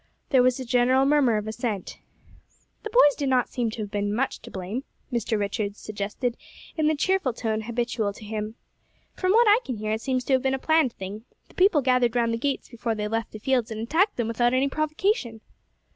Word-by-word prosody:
There 260 -3 +5
was 255 +1 +2
a 260 - -5
general 250 +2 +3
murmur 275 -6 +3
of 210 0 -4
assent. 220 -3 -4 0.8
"The 435 - -5
boys 415 -11 +6
do 285 - -2
not 255 -2 +2
seem 240 -3 -1
to 220 0 -5
have 205 - -8
been 205 0 -1
much 270 +4 -1
to - - -11
blame," 195 +7 -5 0.3
Mr. 230 -2 0
Richards 205 0 -2
suggested 215 +4 -3 0.4
in 310 -2 +1
the 310 - +2
cheerful 370 -4 +1
tone 220 -1 -2
habitual 235 -2 -2
to 210 - -12
him. 215 +1 -4 0.6
"From 370 0 0
what 460 +2 +5
I 420 +2 +6
can 250 - -4
hear 215 0 -3
it 220 +1 -1
seems 255 0 -1
to 270 - 0
have 260 - +4
been 265 0 +1
a - - -2
planned 315 -3 +2
thing; 200 +4 -7 0.2
the - - -19
people 360 -6 +4
gathered 250 -2 +2
round 230 -1 +2
the 230 - -2
gates 275 +2 -2
before 230 -1 -3
they 210 0 -2
left 225 +1 -2
the - - -7
fields 245 +1 0
and 220 -1 -5
attacked 325 - +1
them 235 -2 -1
without 240 +2 +1
any 265 +2 +2
provocation." 310 - -1
240 Hz, 220 wpm, -25 LUFS, 220-270 Hz, 0.8 s, boys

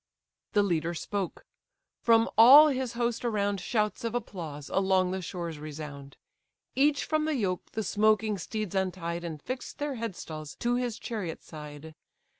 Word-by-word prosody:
The 205 - +4
leader 170 -3 0
spoke. 195 +2 -4 0.6
From 230 -1 +5
all 275 +8 +10
his 260 -3 -2
host 235 0 -1
around 205 -4 0
Shouts 215 +2 -1
of 230 0 -2
applause 160 -11 -5
along 190 -1 +2
the 190 0 -2
shores 170 -3 -5
resound. 145 -2 -8 0.6
Each 285 +1 +2
from 310 -1 +1
the 310 -1 0
yoke 190 -7 -2
the 220 - -2
smoking 215 0 +2
steeds 215 +2 -4
untied, 175 -3 -2
And 160 -3 -5
fix'd 255 - -6
their 290 -1 -2
headstalls 160 -9 -6
to 240 0 0
his 245 -2 -1
chariot 205 -8 -5
side. 150 0 -10
200 Hz, 150 wpm, -29 LUFS, 170-235 Hz, 0.6 s, all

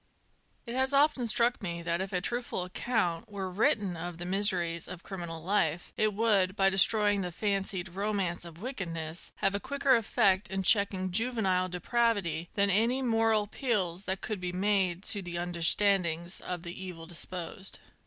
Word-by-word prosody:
It 235 - -5
has 265 +2 +2
often 280 -4 +3
struck 235 +2 +2
me 170 -3 -4
that 170 +1 -1
if 190 - -4
a 180 -2 -1
truthful 240 -3 -2
account 195 +1 -2
were 190 -2 -4
written 195 -1 +1
of 170 0 -6
the 175 - -6
miseries 180 -3 0
of 180 -1 -8
criminal 170 -4 -6
life, 175 -3 0
it 215 -1 +1
would, 200 -4 +2
by 195 -1 +3
destroying 205 +1 +3
the 180 -1 -4
fancied 195 -1 -1
ro 200 +4 -2
mance 185 -4 -2
of 170 -1 -11
wickedness, 170 - -4
have 195 - 0
a 200 - -1
quicker 280 +2 +2
effect 205 -4 +2
in 190 0 -2
checking 190 -2 +3
juvenile 195 -4 +1
de 180 0 -5
pravity 200 -7 0
than 200 0 +3
any 235 +7 +2
moral 225 -3 +2
appeals 205 -5 -2
that 190 +1 -2
ootid 215 -3 -4
be 180 -1 -3
made 190 -1 0
to 205 - +1
the 175 -2 -6
under 175 0 -4
standings 175 -2 +3
of 175 -2 -5
the 170 -1 -6
evil 170 -3 -8
disposed. 175 +2 -5
190 Hz, 175 wpm, -30 LUFS, 175-215 Hz, -, often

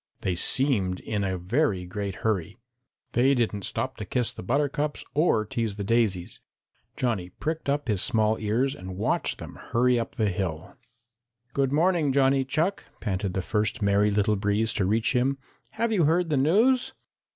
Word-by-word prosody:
They 95 - 0
seemed 95 -3 +1
in 105 -2 -2
a 95 -1 -1
very 95 - 0
great 100 +1 -4
hurry. 105 -1 -1 0.5
They 130 +4 +3
didn't 105 -5 -1
stop 130 0 -2
to 110 - -5
kiss 120 +4 0
the - - -9
buttercups 145 +6 -1
or 145 -8 +2
tease 110 -1 -2
the 100 - -4
daisies. 105 -5 +1 0.6
Johnny 110 -8 -1
pricked 160 - -4
up 145 -1 0
his 105 -5 +1
small 110 -3 +2
ears 115 +6 0
and 95 -4 -8
watched 105 - 0
them - - -9
hurry 125 +1 +2
up 115 - -5
the 110 -2 +1
hill. 90 -3 -4 0.8
"Good 135 -1 +1
morning, 160 -1 +2
Johnny 135 0 +3
Chuck," 160 +9 -1
panted 95 -3 -2
the 95 - -1
first 105 +2 -1
Merry 100 +1 +3
Little 105 +1 +2
Breeze 105 +3 +1
to 95 - 0
reach 110 +6 +1
him, 135 +3 +2 0.4
"have 230 +1 0
you 180 -7 +3
heard 165 +2 +2
the 145 - +2
news?" 220 - +3
115 Hz, 170 wpm, -26 LUFS, 100-140 Hz, 0.8 s, They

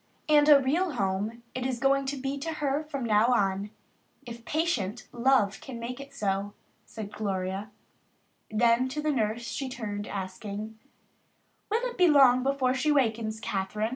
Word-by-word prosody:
"And 300 -1 +5
a 290 -2 +9
real 310 +6 0
home 210 +2 -2
it 255 - -3
is 255 -1 -1
going 275 +1 +2
to 280 +1 -2
be 270 +1 -3
to 325 +3 -3
her 290 -1 -1
from 280 -4 -4
now 215 0 +4
on 200 -4 +1 0.6
if 235 -1 -9
patient 250 - -1
love 240 -5 +2
can 250 -3 -8
make 245 +2 -5
it 275 0 -9
so," 200 -5 -2 0.6
Gloria 195 0 -3 0.8
said. 215 - -3
Then 240 +2 +4
to 285 +4 -4
the 305 - +2
nurse 230 -3 -1
she 270 +3 -4
turned, 210 -5 -5
asking, 205 +3 -6 0.9
"Will 455 +4 0
it 485 -5 -8
be 360 - +6
long 270 -5 +6
before 265 -1 +1
she 265 +4 +1
wakens, 225 -5 +1
Kathryn?" 210 +2 -2
245 Hz, 165 wpm, -28 LUFS, 210-275 Hz, 0.9 s, a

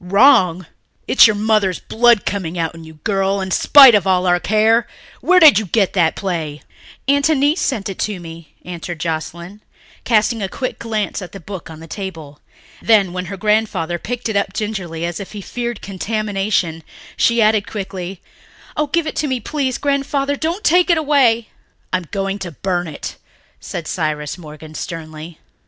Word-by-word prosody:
"Wrong! 185 -3 +4 0.4
It's 265 - +7
your 215 - +1
mother's 210 -3 +1
blood 235 -2 +3
coming 180 -4 -3
out 165 -1 -1
in 165 -1 -11
you, 160 0 -13
girl, 195 -1 0
in 190 -1 -4
spite 270 +2 +8
of 200 -3 +3
all 185 -1 +2
our 175 -1 +3
care! 220 +4 +2 0.3
Where 365 +1 +4
did 305 - +8
you 215 - -5
get 195 +1 +1
that 170 -4 +2
play?" 160 -6 -4 0.4
"Aunt 285 +2 +3
Annice 295 +2 +2
sent 220 -8 -1
it 195 - -7
to 210 -3 -2
me," 165 -1 -11
answered 175 -1 -6
Joscelyn, 170 +4 -5 0.4
casting 225 0 +2
a 195 - -2
quick 255 +6 -4
glance 215 -3 -3
at 180 - -9
the 195 - -8
book 190 -1 -8
on 160 0 -11
the - - -9
table. 165 -5 -8 0.4
Then, 205 -5 +3
when 180 0 -4
her 195 +2 -7
grandfather 200 -5 0
picked 245 +5 -4
it 220 - -3
up 200 -1 0
gingerly, 185 -7 -4
as 175 -1 -4
if 200 - -8
he 210 - -6
feared 240 +2 -5
contamination, 195 -4 -2 0.3
she 235 0 +2
added 215 -2 +3
quickly, 190 -3 -6 0.5
"Oh, 300 0 0
give 335 +3 0
it 310 - -4
to 300 - 0
me, 260 -2 -1
please, 265 +1 -2
Grandfather. 280 0 0
Don't 330 +7 -3
take 355 +3 +4
it 340 - +4
away." 265 -7 +2 0.4
"I - - +4
am 180 - -8
going 195 0 -3
to 185 - -5
burn 175 +2 -2
it," 155 - -7 0.4
said 170 -3 -6
Cyrus 150 -4 -2
Morgan 155 -2 -11
sternly. 160 -1 -7
195 Hz, 180 wpm, -18 LUFS, 175-230 Hz, 0.5 s, spite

